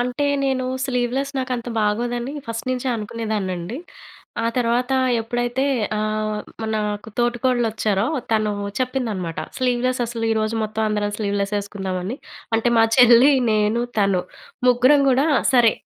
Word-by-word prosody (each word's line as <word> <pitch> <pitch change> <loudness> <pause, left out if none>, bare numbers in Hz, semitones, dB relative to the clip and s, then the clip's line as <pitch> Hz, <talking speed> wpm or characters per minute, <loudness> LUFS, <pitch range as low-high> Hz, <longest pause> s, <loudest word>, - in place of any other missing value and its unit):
అంటే 250 +4 -1 0.2
నేను 265 -1 0 0.2
స్లీవ్‌లెస్ 255 +2 -1
నాకు 260 0 -3
అంత 235 +1 -6
బాగోదని 240 +5 -1
ఫస్ట్ 230 +2 -5
నుంచే 255 +1 -2
అనుకునేదాన్నండి. 210 -3 -3 0.7
ఆ - - +2
తర్వాత 245 +1 +1 0.3
ఎప్పుడైతే 240 +3 -1 0.3
ఆహ్, 215 0 -1 0.2
మనాకు 215 -1 -2
తోటికోడలోచ్చారో 240 -4 +1 0.3
తను 215 -1 +1 0.3
చెప్పిందన్నమాట. 225 -10 -2 0.2
స్లీవ్‌లెస్ 255 0 0
అసలు 230 -1 -4
ఈరోజు 220 0 0
మొత్తం 215 +1 -3
అందరం 210 -1 -1
స్లీవ్‌లెస్ 200 -1 -1
వేసుకుందామని 195 +1 -4 0.4
అంటే 235 +2 +1
మా 225 - +6
చెల్లి, 245 +2 +7 0.2
నేను, 215 +2 +2 0.2
తను, 195 -3 +2 0.5
ముగ్గురం 255 +4 +5
కూడా 270 +4 +3 0.3
సరే. 240 -3 +5
230 Hz, 120 wpm, -21 LUFS, 210-250 Hz, 0.7 s, చెల్లి